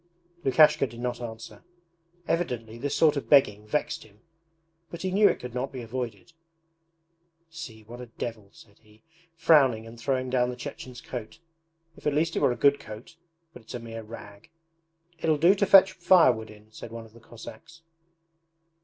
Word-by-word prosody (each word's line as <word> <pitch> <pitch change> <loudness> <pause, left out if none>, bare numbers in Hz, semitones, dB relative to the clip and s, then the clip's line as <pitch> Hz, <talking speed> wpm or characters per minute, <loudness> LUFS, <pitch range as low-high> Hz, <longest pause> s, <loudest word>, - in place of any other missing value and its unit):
Lukashka 140 +1 +5
did 120 0 -12
not 120 0 -3
answer. 115 -1 -9 0.6
Evidently 115 -9 -2
this 140 +3 -2
sort 155 -2 +4
of 140 - -5
begging 105 -7 +4
vexed 150 +7 -2
him 105 -1 -21 0.7
but 170 +2 -8
he 185 - -1
knew 205 +2 +5
it - - -2
could 125 -1 -8
not 125 +2 -3
be 130 -2 -7
avoided. 120 - -6 1.2
'See, 130 -10 -9
what 120 +3 -10
a 125 - -9
devil!' 115 -3 -7
said 100 -2 -19
he, 110 0 -24 0.3
frowning 135 -9 +4
and 115 +1 -12
throwing 130 0 -1
down 125 -1 +2
the 125 - -5
Chechen's 125 0 -8
coat. 120 +2 -7 0.6
'If - - -6
at 145 - +1
least 165 +2 0
it - - +1
were - - +3
a - - -2
good 140 +4 +3
coat, 110 +8 -11 0.4
but 125 - -12
it's 110 - -10
a - - -4
mere 115 -1 -8
rag.' 105 -1 -12 0.7
'It'll 155 -2 +1
do 170 +6 +5
to 200 0 0
fetch 195 -1 +7
firewood 165 - +4
in,' 105 0 -16
said 110 - -10
one 115 0 -8
of 110 - -19
the 115 - -16
Cossacks. 165 +9 -13
125 Hz, 180 wpm, -27 LUFS, 110-150 Hz, 1.2 s, fetch